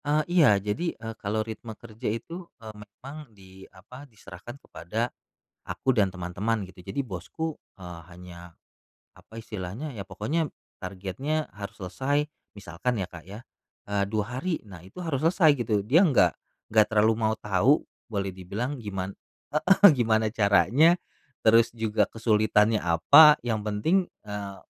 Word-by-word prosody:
Eee, 150 Hz, +1 st, +2 dB
iya 150 Hz, -, +6 dB
jadi, 105 Hz, -, -3 dB
eee, 115 Hz, 0 st, -7 dB
kalau 110 Hz, +2 st, -1 dB
ritme 110 Hz, 0 st, -8 dB
kerja 115 Hz, +1 st, -6 dB
itu, 170 Hz, +11 st, -6 dB
eee, 110 Hz, -2 st, -10 dB
memang 125 Hz, +8 st, -12 dB
di 95 Hz, 0 st, -15 dB
apa 125 Hz, +9 st, -14 dB
diserahkan 110 Hz, +2 st, -12 dB
kepada 115 Hz, -1 st, -5 dB, 0.6 s
aku 130 Hz, -, 0 dB
dan 105 Hz, -5 st, +2 dB
teman-teman 95 Hz, +4 st, -3 dB
gitu, 95 Hz, 0 st, -14 dB
jadi 140 Hz, +8 st, -2 dB
bosku, 130 Hz, -, -6 dB, 0.2 s
eee, 90 Hz, -3 st, -9 dB
hanya 85 Hz, -1 st, -13 dB, 0.6 s
apa 110 Hz, -, -16 dB
istilahnya, 110 Hz, +5 st, -6 dB
ya 110 Hz, -, -8 dB
pokoknya 145 Hz, -, -2 dB, 0.3 s
targetnya 100 Hz, -, -4 dB
harus 100 Hz, -1 st, -8 dB
selesai 135 Hz, +11 st, -1 dB, 0.3 s
misalkan 100 Hz, +6 st, -3 dB
ya 95 Hz, -, -1 dB
Kak 85 Hz, -2 st, -11 dB
ya, 105 Hz, +5 st, -10 dB, 0.4 s
eee, 100 Hz, -1 st, -1 dB
2 110 Hz, +4 st, -3 dB
hari, 175 Hz, -4 st, -3 dB
nah 95 Hz, -5 st, -12 dB
itu 95 Hz, +4 st, -17 dB
harus 145 Hz, -6 st, -2 dB
selesai 165 Hz, -1 st, +4 dB
gitu, 105 Hz, -3 st, 0 dB
Dia 165 Hz, -, +4 dB
nggak 90 Hz, -, +4 dB, 0.4 s
nggak 110 Hz, -1 st, +5 dB
terlalu 110 Hz, 0 st, +3 dB
mau 110 Hz, 0 st, +1 dB
tahu 105 Hz, +8 st, +2 dB, 0.2 s
boleh 100 Hz, -4 st, -3 dB
dibilang 105 Hz, +9 st, -5 dB
giman 95 Hz, -3 st, -5 dB, 0.4 s
heeh, 190 Hz, +5 st, +6 dB
gimana 110 Hz, -4 st, +1 dB
caranya, 115 Hz, -, +4 dB, 0.5 s
terus 115 Hz, +1 st, +5 dB
juga 110 Hz, -2 st, 0 dB
kesulitannya 110 Hz, -1 st, +2 dB
apa 140 Hz, -, +7 dB
yang 110 Hz, -3 st, -1 dB
penting, 110 Hz, -, 0 dB, 0.2 s
eee, 100 Hz, -2 st, -6 dB
110 Hz, 145 wpm, -26 LUFS, 100-130 Hz, 0.6 s, apa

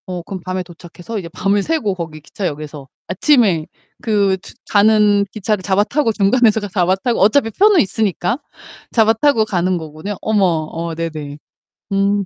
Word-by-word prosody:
어 180 Hz, -1 st, -4 dB
그럼 185 Hz, +1 st, -7 dB
밤에 185 Hz, 0 st, -3 dB
도착해서 175 Hz, +4 st, -8 dB
이제 170 Hz, -3 st, -8 dB
밤을 195 Hz, +4 st, 0 dB
새고 295 Hz, -10 st, 0 dB
거기 160 Hz, -3 st, -7 dB
기차역에서 150 Hz, -4 st, -6 dB, 0.2 s
아침에 190 Hz, -, +2 dB, 0.3 s
그 200 Hz, -4 st, +1 dB
추 -, -, -11 dB, 0.2 s
가는 205 Hz, -1 st, +4 dB
기차를 210 Hz, -1 st, -2 dB
잡아 195 Hz, +1 st, +2 dB
타고 250 Hz, +1 st, 0 dB
중간에서 220 Hz, +2 st, +3 dB
잡아 180 Hz, 0 st, +1 dB
타고 235 Hz, +5 st, -1 dB
어차피 225 Hz, +4 st, +3 dB
표는 405 Hz, -, +4 dB
있으니까 200 Hz, -, -1 dB, 0.5 s
잡아 225 Hz, -1 st, +4 dB
타고 225 Hz, -1 st, +2 dB
가는 185 Hz, -2 st, 0 dB
거군요. 160 Hz, +5 st, -6 dB
어머. 215 Hz, -2 st, +1 dB, 0.3 s
어 165 Hz, 0 st, -4 dB
네네. 155 Hz, -3 st, -5 dB, 0.6 s
음. 200 Hz, 0 st, +1 dB
195 Hz, 335 characters per minute, -18 LUFS, 175-220 Hz, 0.6 s, 가는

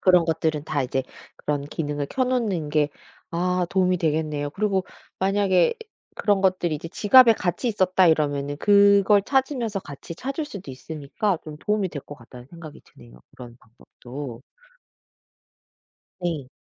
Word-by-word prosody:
그런 180 Hz, -2 st, +5 dB
것들은 160 Hz, -2 st, -1 dB
다 150 Hz, -3 st, -1 dB
이제 130 Hz, +1 st, -1 dB, 0.3 s
그런 145 Hz, -1 st, -2 dB
기능을 145 Hz, -1 st, -3 dB
켜 260 Hz, -1 st, 0 dB
놓는 215 Hz, -12 st, -1 dB
게 150 Hz, -1 st, +2 dB, 0.4 s
아 180 Hz, +1 st, 0 dB
도움이 185 Hz, -1 st, +2 dB
되겠네요. 150 Hz, -2 st, -1 dB
그리고 195 Hz, +2 st, -1 dB, 0.3 s
만약에 190 Hz, -3 st, +2 dB, 0.4 s
그런 205 Hz, -2 st, +1 dB
것들이 185 Hz, -4 st, +1 dB
이제 165 Hz, +3 st, -8 dB
'지갑에 225 Hz, +5 st, +6 dB
같이 185 Hz, +7 st, -2 dB
있었다.' 185 Hz, -3 st, +3 dB
이러면은 145 Hz, -3 st, +1 dB
그걸 200 Hz, +2 st, +5 dB
찾으면서 255 Hz, -5 st, 0 dB
같이 145 Hz, +1 st, -9 dB
찾을 275 Hz, -, -4 dB
수도 200 Hz, -, -9 dB
있으니까 155 Hz, +8 st, -3 dB
좀 150 Hz, -1 st, -9 dB
도움이 210 Hz, 0 st, -1 dB
될 145 Hz, -, -6 dB
것 145 Hz, -, -8 dB
같다는 125 Hz, -1 st, -14 dB
생각이 160 Hz, -1 st, -12 dB
드네요 -, -, -17 dB, 0.2 s
그런 120 Hz, -2 st, -10 dB
방법도. 120 Hz, +2 st, -10 dB, 1.8 s
네. 165 Hz, -7 st, -3 dB
170 Hz, 315 characters per minute, -24 LUFS, 145-200 Hz, 1.8 s, 지갑에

